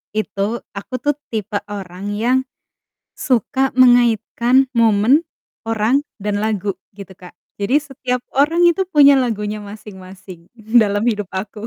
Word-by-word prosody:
itu 215 Hz, +1 st, -2 dB, 0.2 s
aku 200 Hz, -, -9 dB
tuh 290 Hz, -1 st, +1 dB, 0.2 s
tipe 210 Hz, -1 st, -2 dB
orang 195 Hz, -2 st, -8 dB
yang 235 Hz, +5 st, +1 dB, 0.8 s
suka 260 Hz, +2 st, -1 dB
mengaitkan 245 Hz, +1 st, +3 dB
momen, 230 Hz, +6 st, +3 dB, 0.4 s
orang, 225 Hz, +4 st, +1 dB, 0.2 s
dan 205 Hz, 0 st, -2 dB
lagu, 210 Hz, -2 st, -1 dB, 0.2 s
gitu 195 Hz, -2 st, -10 dB
Kak. 180 Hz, -1 st, -14 dB, 0.3 s
Jadi 205 Hz, +8 st, +1 dB
setiap 255 Hz, -3 st, -4 dB, 0.2 s
orang 315 Hz, +5 st, +3 dB
itu 380 Hz, +3 st, +1 dB
punya 285 Hz, -4 st, +6 dB
lagunya 215 Hz, -5 st, -2 dB
masing-masing 190 Hz, -4 st, -12 dB
dalam 220 Hz, -2 st, +1 dB
hidup 210 Hz, -5 st, -1 dB
aku. 210 Hz, +3 st, -6 dB
220 Hz, 125 wpm, -18 LUFS, 205-255 Hz, 0.8 s, punya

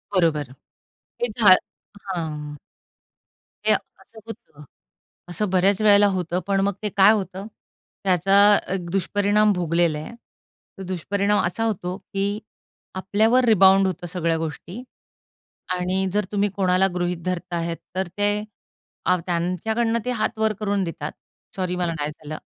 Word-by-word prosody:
बरोबर 150 Hz, -7 st, +1 dB, 0.7 s
ते 240 Hz, -, +1 dB
घा 200 Hz, -4 st, +8 dB, 0.5 s
हां. 150 Hz, -5 st, -4 dB, 1.1 s
ते -, -, +5 dB
असं 225 Hz, -, -7 dB
होतं, 195 Hz, -10 st, -11 dB, 0.7 s
असं 205 Hz, +4 st, -1 dB
बऱ्याच 190 Hz, +2 st, +2 dB
वेळेला 205 Hz, -1 st, +6 dB
होतं. 180 Hz, -1 st, -2 dB
पण 195 Hz, -1 st, +1 dB
मग 200 Hz, +1 st, +1 dB
ते 210 Hz, -, 0 dB
काय 195 Hz, +2 st, +7 dB
होतं, 195 Hz, 0 st, -4 dB, 0.6 s
त्याचा 190 Hz, 0 st, +2 dB, 0.4 s
एक 180 Hz, -3 st, -4 dB
दुष्परिणाम 205 Hz, +3 st, +2 dB
भोगलेला 170 Hz, -3 st, +1 dB
आहे. 155 Hz, -, -8 dB, 0.7 s
तो 195 Hz, -, -7 dB
दुष्परिणाम 200 Hz, +3 st, 0 dB
असा 180 Hz, +6 st, -2 dB
होतो 185 Hz, -4 st, -3 dB
की 200 Hz, +1 st, -3 dB, 0.6 s
आपल्यावर 220 Hz, +7 st, +2 dB
रिबाउंड 195 Hz, -3 st, +5 dB
होतं 175 Hz, -1 st, -4 dB
सगळ्या 165 Hz, -2 st, -1 dB
गोष्टी. 165 Hz, +7 st, -6 dB, 0.9 s
आणि 185 Hz, +1 st, -1 dB
जर 210 Hz, -1 st, +1 dB
तुम्ही 205 Hz, 0 st, +1 dB
कोणाला 185 Hz, -1 st, +3 dB
गृहीत 175 Hz, 0 st, -1 dB
धरता 180 Hz, -1 st, -3 dB
आहेत, 165 Hz, 0 st, -3 dB, 0.2 s
तर 190 Hz, 0 st, -1 dB
ते 205 Hz, 0 st, +1 dB, 0.8 s
त्यांच्याकडून 185 Hz, +7 st, 0 dB
ते 250 Hz, -, -1 dB
हातावर 220 Hz, -2 st, 0 dB
करून 200 Hz, -2 st, 0 dB
देतात. 160 Hz, -3 st, -5 dB, 0.4 s
सॉरी, 185 Hz, -2 st, -2 dB
मला 175 Hz, -2 st, -1 dB
नाही 145 Hz, +1 st, -2 dB
झालं. 155 Hz, 0 st, -8 dB
190 Hz, 130 wpm, -23 LUFS, 175-205 Hz, 1.1 s, घा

